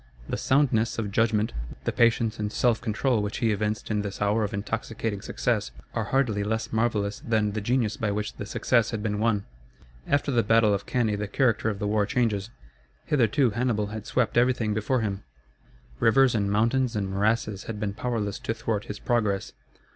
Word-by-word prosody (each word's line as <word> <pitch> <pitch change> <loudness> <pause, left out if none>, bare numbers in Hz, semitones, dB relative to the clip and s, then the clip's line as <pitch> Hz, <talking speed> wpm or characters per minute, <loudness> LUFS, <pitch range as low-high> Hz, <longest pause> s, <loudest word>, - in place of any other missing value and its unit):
The - - -2
soundness 130 -5 +2
of 105 -3 -2
judgment, 110 0 +1 0.3
the - - 0
patience 115 -1 +2
and 105 0 -2
self 120 -2 +2
control 110 +1 +1
which 105 +1 -3
he 115 -2 +1
evinced 105 +1 -2
in 105 -1 +1
this 100 -1 -5
hour 105 +2 +2
of 105 - -2
intoxicating 110 0 -3
success, 110 -1 -1 0.2
are 115 -2 -1
hardly 110 -4 +1
less 110 +2 -2
marvellous 110 -3 0
than 110 -3 0
the 110 +1 -3
genius 115 0 0
by 110 - -1
which 105 +1 -2
the 105 - -7
success 115 +1 +2
had 110 -3 -4
been 105 -2 -1
won. 110 -3 +1 0.6
After 145 0 +1
the 120 -3 +3
battle 115 -1 +4
of 100 - -3
Cannæ 110 -5 0
the 105 - -2
character 115 -1 +1
of 105 - -3
the 105 - -3
war 105 0 +1
changes. 115 -5 0 0.6
Hitherto 135 -2 +2
Hannibal 110 -3 -1
had 110 -1 -6
swept 125 -2 0
everything 120 -3 +2
before 110 +4 0
him. 100 -2 -2 0.8
Rivers 130 +2 +4
and 100 -3 0
mountains 115 +3 +2
and 100 -2 -1
morasses 105 +1 0
had 110 -2 -5
been 105 -1 -2
powerless 110 -3 -2
to 115 - -3
thwart 115 -2 -2
his 105 - -6
progress. 105 -5 0
110 Hz, 185 wpm, -26 LUFS, 105-115 Hz, 0.8 s, battle